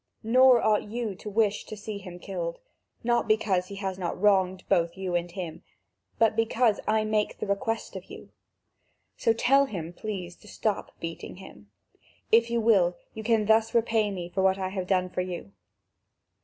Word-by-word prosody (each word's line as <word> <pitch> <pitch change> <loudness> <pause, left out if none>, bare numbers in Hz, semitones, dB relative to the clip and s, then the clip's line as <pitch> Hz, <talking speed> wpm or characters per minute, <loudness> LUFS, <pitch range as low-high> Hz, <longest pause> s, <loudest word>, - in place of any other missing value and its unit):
Nor 250 +1 +6
ought 215 -1 +2
you 230 -2 -3
to 200 +3 -8
wish 210 0 +1
to 215 - -8
see 210 0 -6
him 180 -3 -9
killed; - - -4 0.5
not 240 0 +1
because 200 -4 +2
he 200 - -8
has 190 -1 -4
not 175 -1 -3
wronged 190 -2 +3
both 170 +1 +1
you 190 -2 -3
and 175 0 0
him, 175 -2 -6 0.6
but 225 -1 +3
because 225 0 +2
I 215 0 +2
make 215 -1 0
the - - -3
request 225 +3 -2
of - - -7
you: - - -12 0.8
so 230 - +2
tell 275 +5 +4
him, 170 -7 -6
please, 180 -3 -5
to 210 - -18
stop 210 0 -2
beating 165 0 -6
him. 105 - -13 0.6
If 230 +1 +5
you 235 0 +1
will, 195 -6 +3 0.2
you 220 - -6
can 220 -1 +2
thus 220 +2 +3
repay 225 -2 +2
me 180 -3 -5
for 190 - 0
what 190 0 +3
I 190 -1 -2
have 190 -1 -4
done 185 -1 +2
for 180 - -1
you." 175 - -6
205 Hz, 185 wpm, -27 LUFS, 185-225 Hz, 0.8 s, Nor